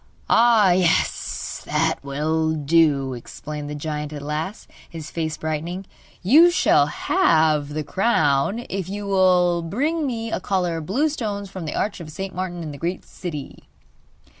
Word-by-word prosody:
'Ah, 225 -5 +5
yes, 175 -2 0
that 160 +1 +1
will 160 +3 0
do!' 145 -3 +2
exclaimed 145 +4 -7
the 150 - -5
giant 150 0 -4
at 145 -2 -7
last, 155 +7 -4 0.2
his 165 -1 -8
face 160 -2 -3
brightening. 165 +5 -4 0.4
'You 305 - +7
shall 345 - +3
have 155 - +2
the 150 +1 -3
crown 185 - +1
if 190 -2 -4
you 205 +1 -5
will 180 -3 +3
bring 285 - -1
me 230 -3 -3
a - - -1
collar 180 -3 -1
of 155 -2 -6
blue 270 +11 +2
stones 205 -9 -4
from 185 -4 -6
the 150 - -4
Arch 205 -2 -1
of 165 -3 -8
St. 190 +4 -6
Martin, 180 -1 -4
in 155 - -5
the 140 - -9
Great 175 +2 -3
City. 155 -7 -8
170 Hz, 160 wpm, -22 LUFS, 150-195 Hz, 0.4 s, You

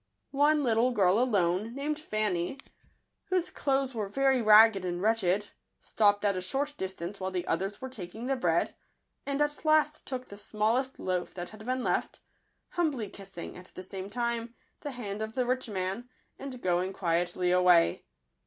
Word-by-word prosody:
One 295 +2 +4
little 235 0 +3
girl 200 -4 +3
alone, 210 -2 +1
named 295 +2 -2
Fanny, 215 - -1 0.7
whose 370 -3 0
clothes 270 -1 0
were 220 -3 -2
Digitized - - -7
by - - -13
Google - - -20
very 265 -2 +4
ragged 215 -2 +7
and 175 -1 -2
wretched, 205 -1 +1 0.3
stopped 205 -1 +2
at 200 -1 +3
a 185 - -2
short 280 +10 -2
distance 190 -3 -5
while 190 0 -2
the 185 -2 -3
others 195 +5 -2
were 260 - -5
taking 220 -2 -8
the 270 +1 +1
bread, 170 -9 +1 0.5
and 280 0 -1
at 295 0 -3
last 310 -1 +2
took 255 -1 -4
the 200 - -10
smallest 230 +6 0
loaf 180 -1 -2
that 175 -1 -5
had 215 +1 -12
been 255 0 -1
left, - - -1 0.5
humbly 290 - -1
kissing, 195 -3 -8
at 180 0 -12
the 185 - -7
same 190 +1 -7
time, 235 +1 -2 0.2
the 290 - -5
hand 215 -6 -5
of 220 0 -4
the 255 0 0
rich 255 -1 -1
man, 195 +5 -3 0.3
and 265 -3 -7
going 180 +1 +1
quietly 175 0 0
away. 180 -2 +4
215 Hz, 180 wpm, -29 LUFS, 185-255 Hz, 0.7 s, ragged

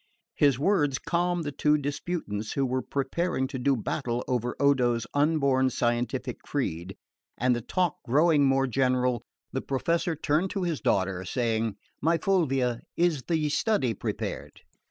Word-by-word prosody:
His 140 -4 +3
words 145 -3 +2
calmed 175 0 0
the 145 - -3
two 150 +2 +2
disputants 145 -7 -3
who 140 - +1
were 130 0 -1
preparing 140 +3 -1
to 130 - -5
do 135 +1 +2
battle 120 +1 -2
over 125 -1 -1
Odo's 125 -5 +2
unborn 140 -3 +3
scientific 120 0 -1
creed, 85 +4 -3 0.4
and 125 0 +2
the 120 - -3
talk 175 - 0
growing 150 +3 +4
more 135 0 +3
general, 125 -1 +1 0.3
the 130 - -2
Professor 165 +5 0
turned 155 +5 0
to 195 -1 -2
his 170 -4 -2
daughter, 95 -1 0
saying, 115 0 -1 0.3
"My 165 +3 +3
Fulvia, 135 -10 +1 0.2
is 170 -5 +2
the 160 -3 +1
study 145 - +1
prepared?" - - -5
135 Hz, 145 wpm, -27 LUFS, 125-160 Hz, 0.4 s, growing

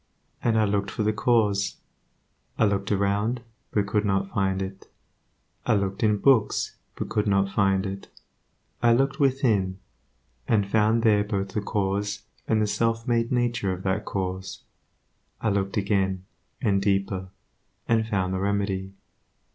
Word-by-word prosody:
And 115 -2 +2
I 110 - +4
looked 100 -1 0
for 110 - -2
the 110 +1 +2
cause. 105 -3 +1 0.8
I - - +4
looked 100 0 0
around, 105 +4 0 0.3
but 105 -2 +1
could 105 +1 0
not 95 -1 0
find 95 -1 0
it; 95 0 -6 0.8
I - - +4
looked 100 -1 -1
in 105 -2 +3
books, 115 -1 +2 0.2
but - - -4
could 105 0 0
not 100 -1 +2
find 95 -1 +2
it; 100 0 -5 0.7
I 120 0 +5
looked 135 +4 +1
within, 115 -9 +2 0.7
and 105 -3 +2
found 110 +2 +2
there 105 -3 +4
both 100 -2 -2
the 105 - -2
cause 100 0 -1 0.2
and 110 - +2
the 105 - +2
self 115 +2 0
made 115 -1 +1
nature 120 -5 +1
of 90 +1 -7
that 100 +3 -1
cause. 95 -1 -4 0.8
I 110 - 0
looked 100 0 -1
again, 95 -2 0 0.4
and 100 -1 +2
deeper, 95 -1 0 0.6
and 110 -1 +2
found 95 -3 0
the 95 - -1
remedy. 100 -1 -1
100 Hz, 150 wpm, -26 LUFS, 95-110 Hz, 0.8 s, I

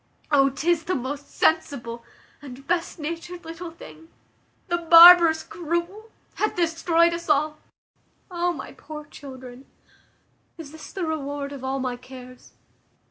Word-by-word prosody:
O 275 -2 +4
'tis 325 +4 -1
the 370 - -1
most 280 +3 -5
sensible, 240 -7 -1 0.4
and 275 -1 -11
best 345 +2 -2
natured 335 +3 -7
little 330 +2 -7
thing! 325 -1 -14 0.6
The 345 -1 -1
barbarous, 335 -1 +8
cruel 345 +6 -4 0.3
hath 425 - -1
destroyed 335 0 +2
us 340 -1 -6
all. 305 +1 +1 0.7
O 350 0 0
my - - -8
poor 300 -1 -10
children! 260 -3 -12 0.9
Is 315 -4 -10
this 315 0 -12
the 375 -3 -4
reward 285 -2 -4
of 275 -2 -9
all 265 +1 -2
my 255 -2 -3
cares? 255 0 -14
315 Hz, 135 wpm, -24 LUFS, 275-340 Hz, 0.9 s, barbarous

